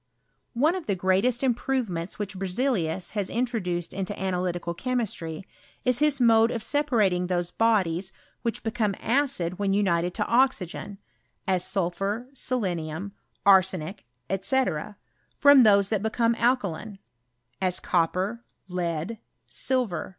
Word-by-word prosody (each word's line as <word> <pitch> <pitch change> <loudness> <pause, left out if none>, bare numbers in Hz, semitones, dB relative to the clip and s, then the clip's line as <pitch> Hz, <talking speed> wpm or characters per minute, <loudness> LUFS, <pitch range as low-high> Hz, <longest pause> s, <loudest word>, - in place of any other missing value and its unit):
One 300 +8 +3
of 370 -3 -5
the 200 - +1
greatest 190 +7 +2
improvemeats 240 -9 -1
which 205 -1 -4
Berzelius 190 -2 -1
lias 200 -3 -1
introduced 215 -8 -2
into 195 +1 -4
analytical 180 -2 -2
chemistry, 195 -7 -3 0.4
is 250 -1 +3
his 295 -2 +3
mods 230 -1 +4
of 225 - -3
separating 215 -11 +1
those 175 -1 -1
bodies 190 -5 +1 0.3
which 230 - -3
became 220 -3 -1
acid 230 -9 0
when 200 -1 +1
unitf^ 180 -3 +1
to 210 - 0
oxygen, 210 -6 0 0.5
as 185 -2 +1
sulphur, 195 +5 -1
selenium, 190 - -3 0.3
arsenic, 190 - +3 0.2
&c., 195 +8 +2 0.8
those 220 -9 +7
that 215 -3 0
become 230 +2 +1
alkaline, 220 -5 -1 0.6
as 185 -1 +2
copper, 185 +7 0 0.2
lead, 180 +3 -3 0.3
silver. 250 -9 -1
200 Hz, 115 wpm, -26 LUFS, 180-240 Hz, 0.8 s, those